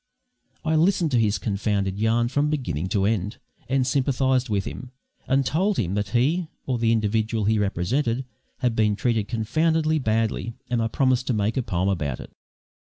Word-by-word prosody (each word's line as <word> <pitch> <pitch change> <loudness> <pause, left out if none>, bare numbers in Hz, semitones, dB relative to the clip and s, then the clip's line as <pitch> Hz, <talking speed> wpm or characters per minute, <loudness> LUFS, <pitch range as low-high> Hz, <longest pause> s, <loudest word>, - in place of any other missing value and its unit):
I 160 - +1
listened 170 0 +2
to 125 - +3
his 105 -2 +2
confounded 100 -2 -1
yarn 115 +2 +2
from 145 +4 +1
beginning 95 - -2
to 95 0 +1
end, 105 0 -1 0.3
and 130 -1 +2
sympathised 130 -1 +1
with 100 -2 0
him, 130 - -7 0.4
and 135 +1 +2
told 185 +9 +1
him 95 -4 0
that 105 -1 -1
he, 150 - +1 0.2
or 125 -3 -1
the 115 0 +2
individual 110 0 0
he 110 +1 +2
represented, 115 - 0 0.4
had 120 -2 +1
been 105 -2 +2
treated 110 -1 0
confoundedly 155 +8 +1
badly; 115 -1 -1 0.2
and 120 -2 +1
I 115 - +1
promised 130 +1 +1
to 130 - +1
make 105 +1 0
a 130 - +1
poem 95 -5 -1
about 75 -10 -1
it. - - -10
115 Hz, 175 wpm, -24 LUFS, 105-135 Hz, 0.4 s, to